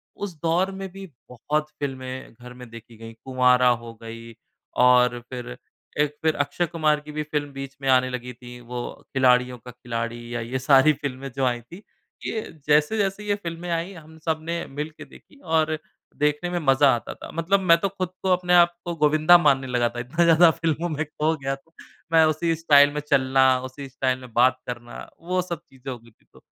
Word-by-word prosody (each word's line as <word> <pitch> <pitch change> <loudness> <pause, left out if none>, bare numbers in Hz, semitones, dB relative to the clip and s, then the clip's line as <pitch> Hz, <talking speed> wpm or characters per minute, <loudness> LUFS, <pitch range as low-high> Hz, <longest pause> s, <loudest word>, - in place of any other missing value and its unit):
उस 195 -5 -6
दौर 175 +4 +1
में 195 - -4
भी 195 +1 -9 0.2
बहुत 150 +5 -2
फ़िल्में 130 -3 -5
घर 125 +2 -12
में 125 -1 -12
देखी 115 0 -13
गईं। 115 0 -10
कुँवारा 125 -1 +4 0.2
हो 115 -1 -9
गई 115 0 -9 0.5
और 125 -1 +4
फिर 125 -1 -7 0.4
एक 150 0 +1
फिर 160 -1 +2
अक्षय 145 +4 -1
कुमार 155 -2 +1
की 150 0 -11
भी 150 0 -3
फ़िल्म 145 -1 -3
बीच 135 0 -7
में 135 - -1
आने 130 0 +4
लगी 125 0 -5
थी। 120 0 -12
वो 120 0 -6 0.3
खिलाड़ियों 125 -1 +3
का 125 +2 -12
खिलाड़ी 120 0 -5
या 120 - -2
ये 125 +3 -3
सारी 135 +3 +5
फ़िल्में 135 -1 -5
जो 135 - 0
आई 120 -1 0
थी। 175 - -14 0.4
ये 220 - -2 0.3
जैसे-जैसे 195 +7 +2
ये 205 - +2
फ़िल्में 175 -2 -6
आईं 170 +3 -2
हम 160 -1 -14
सबने 165 +1 -2
मिलकर 150 +3 -6
देखीं 285 - -18
और 160 -1 +1 0.4
देखने 150 +4 0
में 175 - -2
मज़ा 140 -1 +4
आता 115 - -6
था। - - -11
मतलब 170 +5 +1
मैं 170 -3 +5
तो 195 - 0
खुद 185 -2 -4
को 190 - 0
अपने 180 0 +1
आप 175 -1 +6
को 170 - -3
गोविंदा 155 +3 +5
मानने 135 -5 +2
लगा 120 -1 +1
था। 120 +1 -7
इतना 150 +9 0
ज़्यादा 165 0 +6
फ़िल्मों 165 +1 -2
में 155 -1 -2
खो 155 +2 -1
गया 135 0 -2
तो 165 +5 -26 0.4
मैं 160 -1 +6
उसी 155 +2 +1
स्टाइल 145 -3 +5
में 150 - -2
चलना 135 -2 +3 0.2
उसी 135 +1 -8
स्टाइल 130 -1 -1
में 125 -3 -13
बात 130 +2 +4
करना। 120 -1 -7 0.2
वो 180 +2 -1
सब 175 -1 -5
चीज़ें 135 0 -8
हो 125 - -6
गई 115 0 -20
थी - - -35
तो - - -17
145 Hz, 200 wpm, -24 LUFS, 125-165 Hz, 0.5 s, आप